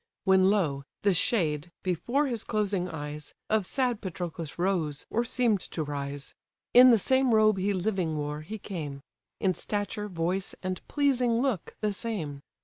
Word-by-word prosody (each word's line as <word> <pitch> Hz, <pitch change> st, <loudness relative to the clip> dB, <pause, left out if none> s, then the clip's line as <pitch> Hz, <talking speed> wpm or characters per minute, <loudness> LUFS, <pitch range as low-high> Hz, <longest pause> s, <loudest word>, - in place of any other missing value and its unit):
When 190 Hz, -1 st, +5 dB
lo! 165 Hz, -10 st, +1 dB, 0.2 s
the 200 Hz, -1 st, +4 dB
shade, 170 Hz, -, +1 dB
before 215 Hz, -, +1 dB
his 240 Hz, -5 st, -2 dB
closing 200 Hz, -4 st, -1 dB
eyes, 150 Hz, -2 st, -7 dB, 0.2 s
Of 215 Hz, -4 st, +2 dB
sad 250 Hz, -4 st, 0 dB
Patroclus 170 Hz, -4 st, -5 dB
rose, 170 Hz, -6 st, -1 dB
or 235 Hz, -, +1 dB
seem'd 235 Hz, -4 st, +2 dB
to 160 Hz, -, -3 dB
rise: 140 Hz, -1 st, -5 dB, 0.4 s
In 250 Hz, +1 st, +9 dB
the 235 Hz, -, +7 dB
same 260 Hz, +2 st, +3 dB
robe 215 Hz, -2 st, +4 dB
he 200 Hz, +2 st, +1 dB
living 185 Hz, -4 st, -1 dB
wore, 150 Hz, 0 st, -3 dB
he 210 Hz, +8 st, -6 dB
came: 155 Hz, -9 st, -6 dB, 0.4 s
In 190 Hz, -2 st, +2 dB
stature, 205 Hz, +3 st, -3 dB
voice, 180 Hz, +1 st, -2 dB
and 185 Hz, -1 st, -3 dB
pleasing 255 Hz, -5 st, +2 dB
look, 250 Hz, -9 st, -1 dB
the 210 Hz, -1 st, 0 dB
same. 180 Hz, -, -4 dB
190 Hz, 155 wpm, -28 LUFS, 160-220 Hz, 0.4 s, In